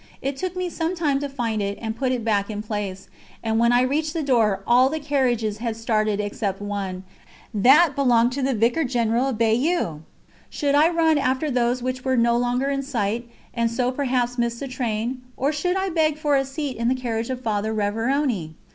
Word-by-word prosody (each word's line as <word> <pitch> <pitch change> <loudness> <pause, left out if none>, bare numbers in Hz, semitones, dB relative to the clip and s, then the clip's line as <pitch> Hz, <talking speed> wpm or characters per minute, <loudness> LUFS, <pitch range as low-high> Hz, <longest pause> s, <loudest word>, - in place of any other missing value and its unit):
It 275 0 -3
took 365 +5 -4
me 365 0 -2
some 335 +1 -2
time 295 -5 +1
to 285 0 -4
find 230 -6 -2
and 205 +3 -3
put 255 +2 -1
it 245 -3 -2
back 205 -2 +1
in 210 -1 -4
place, 205 -3 -4 0.4
and 225 0 0
when 235 +1 +4
I 245 +1 +4
reached 300 +4 0
the 325 -2 -2
door 230 -7 +2
all 250 +2 +5
the 315 +2 -3
carriages 245 -8 0
had 230 -1 -3
started 215 -2 0
except 205 -1 -2
one; 200 -2 -4 0.5
that 275 - +5
belonged 245 -3 +3
to 275 +2 -3
the 265 -1 +1
Vicar 235 +8 +2
General 240 -1 +1
of 245 - -3
Bayeux! 230 - +1 0.5
Should 285 -1 -1
I 300 +3 +5
run 325 -3 +3
after 265 +3 0
those 245 0 +1
which 255 0 -3
were 260 -1 +1
no 235 0 +3
longer 245 +3 0
in 275 0 -1
sight 235 -3 -2 0.2
and 235 -1 +1
so 250 +2 0
perhaps 250 -2 -1
miss 235 0 0
the 275 - -5
train, 250 -1 -3 0.2
or 275 +3 +1
should 360 +5 -1
I 385 0 -1
beg 310 -2 +1
for 295 -2 +1
a 270 0 +2
seat 270 0 -4
in 235 +1 -1
the 255 - +2
carriage 230 -2 -3
of 255 -1 -3
Father 215 -1 -1
Révérony? 220 - -1
245 Hz, 205 wpm, -23 LUFS, 225-275 Hz, 0.5 s, all